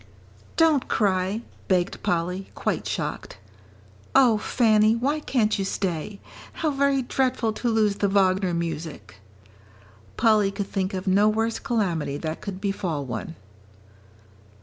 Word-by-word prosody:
"Don't 320 -5 +4
cry," 195 +1 0 0.2
begged 180 0 0
Polly, 180 +3 -1
quite - - -2
shocked. - - -4 0.8
"Oh, 245 -5 +5
Fanny, 215 -2 +3
why 280 +6 0
can't 220 -8 0
you - - 0
stay? 190 0 -3 0.3
How 315 -2 -1
very 275 -1 +2
dreadful 250 -3 0
to 240 +2 -2
lose 215 -3 +2
the 205 - +1
Wagner 190 -2 +2
music!" 160 - -5 1.0
Polly 215 -3 +4
could 200 0 -4
think 190 0 -1
of 185 - -4
no 200 +2 +4
worse 225 +1 0
calamity 180 - -1
that 160 +1 -5
could 195 -2 -6
befall 180 -7 -2
one. 125 +7 -5
200 Hz, 125 wpm, -25 LUFS, 185-230 Hz, 1.0 s, Oh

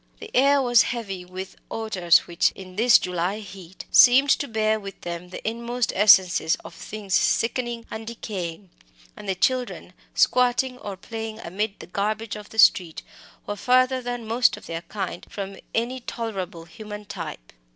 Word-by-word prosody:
The - - -10
air 275 +1 +4
was 240 -2 +5
heavy 200 -7 -3
with 185 +1 -8
odours 185 -7 +2
which, 170 -1 +2
in 185 -1 -11
this 235 +3 +6
July 180 +2 -2
heat, 190 -3 -11
seemed 265 +3 +7
to 285 - +2
bear 220 -1 +1
with 195 -2 -9
them 175 +1 -6
the 185 - -7
inmost 235 +1 -2
essences 190 -5 +5
of - - -9
things 200 +2 -7
sickening 235 +2 +1
and 220 0 -6
decaying; 190 -5 -6 0.4
and 205 - -8
the 190 - +1
children, 250 +6 -1 0.2
squatting 250 0 +2
or 200 -2 -7
playing 225 +1 -6
amid 200 +4 -3
the - - -9
garbage 215 +4 -2
of 210 -1 -10
the 220 - -12
street, 175 -6 +4 0.4
were 205 - -4
further 255 +3 +2
than 245 -1 -5
most 230 +2 +2
of - - -13
their 165 0 -5
kind 190 -2 -5
from 195 -1 -6 0.2
any 240 +3 -1
tolerable 195 -9 -5
human 210 +3 -9
type. - - -8
215 Hz, 160 wpm, -24 LUFS, 185-235 Hz, 0.4 s, seemed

